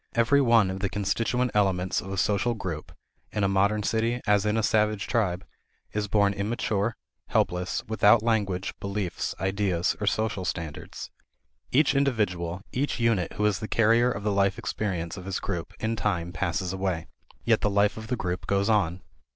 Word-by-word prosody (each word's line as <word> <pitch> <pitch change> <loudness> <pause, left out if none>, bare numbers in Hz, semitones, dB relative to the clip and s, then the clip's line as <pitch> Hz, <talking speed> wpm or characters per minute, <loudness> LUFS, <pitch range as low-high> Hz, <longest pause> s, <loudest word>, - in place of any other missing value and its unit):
Every 120 +5 +4
one 115 -6 +4
of 95 - -5
the 100 0 -1
constituent 115 +6 0
elements 95 -2 +1
of 95 - -8
a 95 - -3
social 105 +5 +1
group, 85 -8 -5 0.4
in 105 - -1
a - - +4
modern 100 +2 +2
city 115 +3 0
as 105 -1 +3
in 105 +1 +1
a 110 - +1
savage 105 -1 +2
tribe, 95 -6 0 0.5
is 105 -1 -1
born 100 0 +3
immature, 105 +1 -1 0.3
helpless, 90 +1 0
without 110 0 +4
language, 100 -5 0
beliefs, 100 -2 -3
ideas, 95 -2 0
or 105 - -1
social 105 -2 0
standards. 80 -4 -5 0.6
Each 145 +3 +4
individual, 100 -10 0
each 140 +1 -1
unit 115 -7 +1
who 105 - -1
is 105 -2 +2
the 110 - -4
carrier 115 +3 +3
of 100 - -5
the 105 - +1
life 100 -1 +2
experience 90 -4 -3
of 90 - -8
his 95 0 -2
group, 85 -1 -4
in 110 +1 -1
time 90 -6 -1
passes 90 +1 -2
away. 95 -4 -2 0.4
Yet - - +3
the 105 - +2
life 100 +1 +2
of 110 0 -8
the 125 - -1
group 90 -3 -3
goes 100 +2 +1
on. 95 -4 +1
100 Hz, 175 wpm, -27 LUFS, 95-110 Hz, 0.6 s, Every